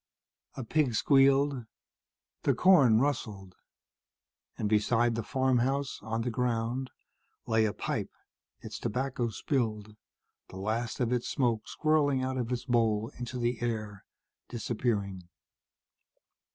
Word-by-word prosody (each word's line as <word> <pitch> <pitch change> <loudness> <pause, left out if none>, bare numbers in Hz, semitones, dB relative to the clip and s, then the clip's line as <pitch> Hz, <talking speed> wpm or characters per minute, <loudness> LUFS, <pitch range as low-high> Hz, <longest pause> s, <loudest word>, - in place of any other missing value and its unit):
A 130 - -5
pig 130 -1 +1
squealed. 135 -1 +3 0.7
The - - +2
corn 140 -12 +6
rustled. 110 -9 -2 1.0
And 105 - -1
beside 115 +3 +2
the 115 - -2
farmhouse, 130 +2 0
on 115 +1 -3
the 125 - -2
ground, 125 +1 -1 0.6
lay 110 -1 +2
a 105 - +1
pipe, - - -3 0.5
its - - -7
tobacco 125 0 -2
spilled, 110 -4 -2 0.5
the 95 - -10
last 110 +4 -2
of 125 -1 +1
its 120 -1 -1
smoke 115 -5 0
swirling 145 -4 +1
out 130 0 -2
of 125 -1 -2
its 125 -1 -2
bowl 115 -3 +1
into 125 +1 -5
the 120 -1 -1
air, 110 -4 -3 0.5
disappearing. 105 -6 -2
120 Hz, 120 wpm, -30 LUFS, 110-130 Hz, 1.0 s, corn